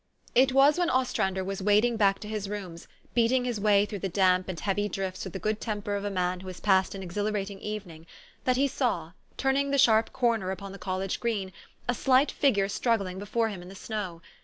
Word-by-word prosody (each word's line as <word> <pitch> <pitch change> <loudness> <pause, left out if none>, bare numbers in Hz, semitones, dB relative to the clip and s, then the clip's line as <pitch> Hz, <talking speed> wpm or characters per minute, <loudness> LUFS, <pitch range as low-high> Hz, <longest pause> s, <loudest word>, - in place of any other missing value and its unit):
" - - -27
It 265 0 +3
was 275 +5 +5
when 350 - +2
Ostrander 190 -7 0
was 195 +1 -4
wading 210 +4 +3
back 195 -2 +3
to 210 - -7
his 210 -2 -4
rooms, 185 -5 -7 0.3
beating 245 +2 +3
his 240 -4 -2
way 205 -1 +4
through 205 -1 -6
the 195 - -2
damp 185 0 +2
and 175 -3 -4
heavy 205 +1 -1
drifts 190 0 -4
with 190 - -7
the - - -3
good 215 +3 -2
temper 205 -2 -3
of 200 - -3
a 205 - -1
man 180 -2 -1
who 190 - -10
has 185 -1 -7
passed 190 -1 +2
an 195 - -6
exhilarating 200 +1 -3
evening, 185 -7 -7 0.4
that 255 -1 +2
he 280 +1 +3
saw, 205 - -1 0.3
turning 270 +1 +1
the 280 - +1
sharp 225 -3 +4
corner 230 -6 +1
upon 190 +1 -5
the 195 - -10
college 190 0 -2
green, 205 -5 -2 0.3
a 245 - +2
slight 265 +3 +3
figure 210 -9 +2
struggling 200 -3 -1
before 225 +3 0
him 195 -4 -7
in 180 - -11
the 195 - -11
snow. 185 -5 -5
205 Hz, 220 wpm, -28 LUFS, 190-230 Hz, 0.4 s, was